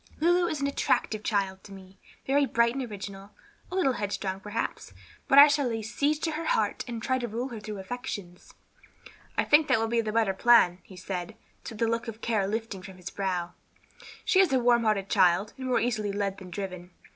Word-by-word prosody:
Lulu 350 +2 +3
is 310 - -3
an - - +1
attractive 220 -5 0
child 195 -3 -1
to 200 - -13
me, 190 0 -13 0.3
very 280 +1 +2
bright 235 -1 +2
and 270 0 -3
original, 200 -1 -8 0.4
a - - -4
little 335 -9 +2
headstrong, 200 -3 -3
perhaps, 205 +1 -4 0.3
but 270 - +4
I 285 - +12
shall 285 -2 +1
lay 225 -2 -3
siege 285 +7 0
to 320 - -1
her 315 +2 -4
heart - - 0
and 230 -2 -5
try 260 -1 +1
to 240 - -3
rule 235 +4 -4
her 230 -3 -7
through 210 0 -7
her 195 - -6
affections." 190 -4 -7 0.9
"I - - +3
think 295 +1 +4
that - - +3
will 225 - 0
be 230 0 +1
the 215 -1 -3
better 220 -3 +2
plan," 190 -4 +5
he 190 - -15
said, 180 -1 -5 0.3
the 225 0 -2
look 230 +1 -1
of 225 -1 -7
care 215 -4 0
lifting 220 -2 -4
from 190 0 -11
his 180 +1 -8
brow; 180 -3 -2 0.7
"she 375 - +3
is 380 -6 +5
a 265 - +4
warm 240 -1 +3
hearted 205 -3 +1
child, 190 +1 +3
and 260 -1 -6
more 250 - +2
easily 215 -4 -1
led 200 -1 -2
than 185 -2 -10
driven. 180 -1 -6
220 Hz, 215 wpm, -28 LUFS, 195-250 Hz, 0.9 s, I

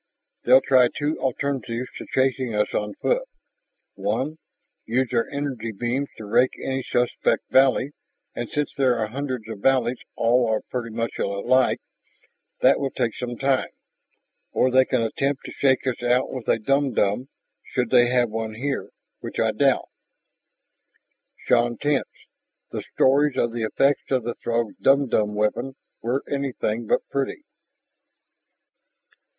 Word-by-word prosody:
They'll 130 - +7
try 130 -2 +5
two 145 +5 -2
alternatives 130 -2 -2
to - - -8
chasing 130 -3 +1
us 105 - 0
on 105 -1 -2
foot. - - +1 0.7
One, 155 +4 -2 0.5
use 125 +2 +1
their 115 -2 +1
energy 135 -5 -3
beams 120 +6 -2
to 110 - -8
rake 120 +5 +2
any 135 0 -2
suspect 120 -1 0
valley, 135 +1 +4 0.4
and 120 -1 -5
since 150 -1 -2
there 130 -3 +3
are 110 -2 -1
hundreds 130 -2 -4
of 110 -3 -7
valleys 125 +1 +2 0.2
all 115 -2 +2
pretty 120 -2 -3
much 115 +1 -3
alike, 100 +6 +2 0.8
that - - +5
will 140 - -1
take 115 -3 -2
some 120 -1 -5
time. 135 -1 +1 0.8
Or 130 - +2
they 130 +1 +5
can 130 -3 0
attempt 135 +5 -1
to - - -7
shake 135 -2 +2
us 130 -2 -2
out 125 +1 +2
with 130 -4 -6
a - - +3
dumdum 130 -2 +1 0.4
should 125 -2 -1
they 120 -1 +6
have 125 -2 +2
one 110 0 -4
here, 135 +4 -3 0.3
which - - -7
I - - +3
doubt." - - +2 1.6
Shann 120 -1 +2
tensed. 145 +1 0 0.6
The - - -3
stories 140 +2 +3
of 120 - +1
the 115 -1 -2
effects 135 +6 +1
of 130 -3 +1
the 120 +1 -3
Throg's 115 -2 -2
dumdum 130 -7 +2
weapon 120 +5 -1 0.3
were 125 +4 -1
anything 125 -5 -2
but - - +1
pretty. 140 - -2
125 Hz, 145 wpm, -24 LUFS, 115-135 Hz, 1.6 s, They'll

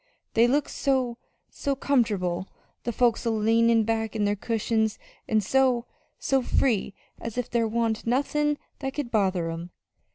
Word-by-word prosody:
They 230 +1 +5
look 285 +3 +2
so 255 -3 0 0.3
so 280 -1 -2
comfortable 200 -10 0 0.4
the 240 - 0
folks 240 0 +2
a 235 - 0
leanin' 225 +1 +3
back 225 0 -1
on 210 -2 +1
their 205 0 +1
cushions; 220 0 0 0.3
an' 215 -1 +2
so 255 +2 +2 0.3
so 270 -1 +1
free, 230 -5 +1 0.2
as 230 0 -6
if 250 - -2
there 230 -1 +2
wa'n't 225 0 -1
nothin' 295 +4 +1 0.2
that 270 -1 -4
could 285 -5 -3
bother 185 -6 +1
'em. 165 +1 -6
230 Hz, 155 wpm, -26 LUFS, 215-255 Hz, 0.4 s, They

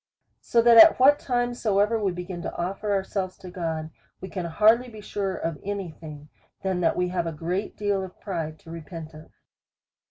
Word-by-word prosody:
So 230 -1 +2
that 235 -1 +7
at 325 +7 +9
what 285 +3 +6
time 245 -1 -1
soever 215 -1 +1
we 195 - +1
begin 175 0 -6
to - - -5
offer 195 +4 -3
ourselves 190 -1 -2
to 180 - -10
God, 160 -3 -4 0.3
we 190 - -8
can 180 -1 -4
hardly 220 +8 +3
be 220 -2 -11
surer 200 -2 -3
of 165 -2 -4
any 200 -3 -4
thing, 150 -2 -11 0.3
than 190 -2 -1
that 170 - +1
we 180 0 0
have 175 -2 -2
a - - -2
great 175 +6 -4
deal 205 -2 0
of 185 -1 -10
pride 165 -6 -4
to 165 - -12
repent 165 -1 -8
of. 155 +1 -13
185 Hz, 195 wpm, -25 LUFS, 165-210 Hz, 0.3 s, at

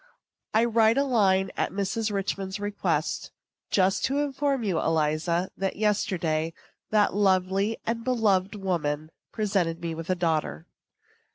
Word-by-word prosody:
I 225 +2 +5
write 225 0 +3
a 280 - +4
line, 195 -7 +2
at - - -1
Mrs. 210 +3 -1
Richman's 195 0 -3
request, 205 0 -1 0.4
just 190 -1 +2
to 275 - 0
inform 280 -2 0
you, 190 -6 0
Eliza, 165 +3 0
that, 195 0 -2
yesterday, 170 -6 0 0.3
that 210 -1 +3
lovely 195 +2 +2
and 230 0 -2
beloved 215 -5 +1
woman 155 -6 -2 0.2
presented 195 -6 0
me 170 -1 -3
with 165 +1 -7
a 185 - +2
daughter. 160 - -1
195 Hz, 130 wpm, -26 LUFS, 170-220 Hz, 0.4 s, I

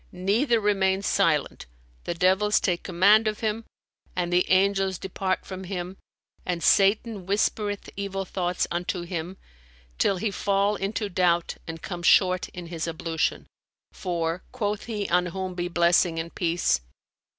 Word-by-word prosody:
neither 220 +7 +1
remain 195 -2 +1
silent, 165 - +1 0.4
the - - -2
devils 190 +4 +3
take 175 -3 0
command 200 +5 +4
of 215 0 -2
him; 220 0 -1 0.5
and 175 -1 -1
the 180 +1 +2
angels 195 0 +2
depart 190 0 -2
from 190 0 -7
him 180 0 -5 0.5
and 175 -2 -3
Satan 200 0 +3
whispereth 205 0 0
evil 195 -1 -3
thoughts 180 -1 -1
unto 175 +1 -2
him, 175 +1 -5 0.6
till 195 - +2
he 205 +3 -1
fall 200 +1 +1
into 205 +2 -2
doubt 175 -2 +1
and 165 0 -7
come 175 -2 -5
short 185 +1 +4
in 180 -1 -8
his 165 -1 -4
ablution. 165 -1 -2 0.5
For 170 -1 -2
(quoth 210 -4 -2
he 210 -4 -3
on 180 +1 +2
whom 185 +1 -4
be 175 0 -3
blessing 170 -1 +3
and 165 +1 -4
peace!) 170 - +1
185 Hz, 145 wpm, -26 LUFS, 175-200 Hz, 0.6 s, command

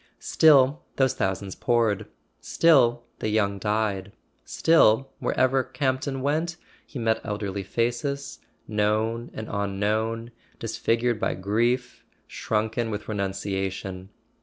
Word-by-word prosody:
Still 145 -2 +4
those 130 -1 +2
thousands 95 -3 -2
poured; 115 -4 +1 0.3
still 125 -8 +3 0.2
the 110 - -1
young 100 -2 +1
died; 105 -2 -1 0.3
still, 135 -5 +3
wherever 130 0 +2
Campton 135 0 -2
went, 160 +4 0 0.3
he - - -8
met 115 -2 0
elderly 100 -2 -3
faces, 120 +7 -2 0.3
known 110 +3 0
and 110 - -6
unknown, 110 +3 -1 0.3
disfigured 115 +1 0
by - - 0
grief, 120 +6 -1 0.2
shrunken 110 +2 -2
with 105 -1 -5
renunciation. 95 -2 -3
110 Hz, 105 wpm, -25 LUFS, 105-130 Hz, 0.3 s, Still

